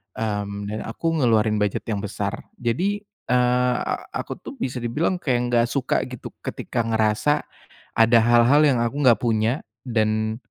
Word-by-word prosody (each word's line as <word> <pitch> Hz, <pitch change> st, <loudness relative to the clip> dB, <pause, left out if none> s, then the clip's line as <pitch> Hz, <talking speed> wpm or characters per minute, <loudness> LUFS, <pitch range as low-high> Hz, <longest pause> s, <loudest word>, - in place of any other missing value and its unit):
mmm, 100 Hz, -2 st, -3 dB
dan 110 Hz, -, -3 dB
aku 165 Hz, +9 st, -2 dB
ngeluarin 110 Hz, -4 st, +3 dB
bujet 105 Hz, -1 st, -1 dB
yang 105 Hz, -2 st, -1 dB
besar. 100 Hz, -1 st, -3 dB, 0.2 s
Jadi, 185 Hz, -, -1 dB
eee, 125 Hz, -10 st, +1 dB
a -, -, -3 dB
aku -, -, -4 dB
tuh 280 Hz, -, -9 dB
bisa 130 Hz, -, -3 dB
dibilang 145 Hz, +10 st, 0 dB
kayak 130 Hz, -7 st, +1 dB
enggak 120 Hz, -1 st, +3 dB
suka 135 Hz, -1 st, 0 dB
gitu 125 Hz, -2 st, -8 dB
ketika 120 Hz, -2 st, -3 dB
ngerasa 110 Hz, +6 st, +1 dB, 0.5 s
ada 115 Hz, +1 st, +6 dB
hal-hal 120 Hz, +5 st, +5 dB
yang 135 Hz, -4 st, +3 dB
aku 135 Hz, +5 st, -2 dB
gak 120 Hz, -, +6 dB
punya 115 Hz, +3 st, +1 dB, 0.2 s
dan, 110 Hz, -2 st, 0 dB
120 Hz, 155 wpm, -23 LUFS, 110-125 Hz, 0.5 s, ada